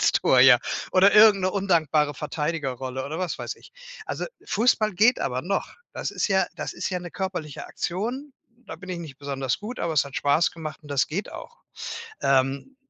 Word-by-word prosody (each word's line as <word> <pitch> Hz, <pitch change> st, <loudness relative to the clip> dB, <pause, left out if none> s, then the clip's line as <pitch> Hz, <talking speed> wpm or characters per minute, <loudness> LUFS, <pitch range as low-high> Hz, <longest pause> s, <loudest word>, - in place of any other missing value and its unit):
Ins -, -, +3 dB
Tor, 130 Hz, -, +4 dB
ja. 125 Hz, -1 st, +8 dB, 0.3 s
Oder 190 Hz, +2 st, +5 dB
irgend 210 Hz, -3 st, +7 dB
'ne 185 Hz, -, +2 dB
undankbare 160 Hz, -7 st, +1 dB
Verteidigerrolle 135 Hz, -4 st, -3 dB
oder 155 Hz, +4 st, -5 dB
was 185 Hz, -2 st, -3 dB
weiß -, -, -5 dB
ich. -, -, -18 dB, 0.3 s
Also -, -, -3 dB, 0.2 s
Fußball 215 Hz, -1 st, +2 dB
geht 225 Hz, +7 st, +4 dB
aber 125 Hz, 0 st, -2 dB
noch. 195 Hz, +3 st, -1 dB, 0.2 s
Das -, -, -4 dB
ist -, -, -1 dB
ja 190 Hz, -1 st, +3 dB
das -, -, -4 dB
ist -, -, -3 dB
ja 180 Hz, -, -1 dB
'ne 175 Hz, -1 st, -8 dB
körperliche 180 Hz, -6 st, -5 dB
Aktion. 245 Hz, +11 st, -4 dB, 0.3 s
Da -, -, -7 dB
bin 195 Hz, -, -12 dB
ich 180 Hz, -2 st, -4 dB
nicht 150 Hz, -6 st, -9 dB
besonders 135 Hz, -3 st, -2 dB
gut, 225 Hz, +5 st, -7 dB
aber 165 Hz, -, -1 dB
es 145 Hz, -2 st, +3 dB
hat 140 Hz, -, -9 dB
Spaß 145 Hz, +4 st, +2 dB
gemacht 155 Hz, -2 st, -7 dB
und 150 Hz, -, -14 dB
das 135 Hz, -2 st, +2 dB
geht 185 Hz, +7 st, -4 dB
auch, 475 Hz, -, -10 dB, 0.6 s
ähm. 135 Hz, -, +1 dB
165 Hz, 195 wpm, -25 LUFS, 140-195 Hz, 0.6 s, ja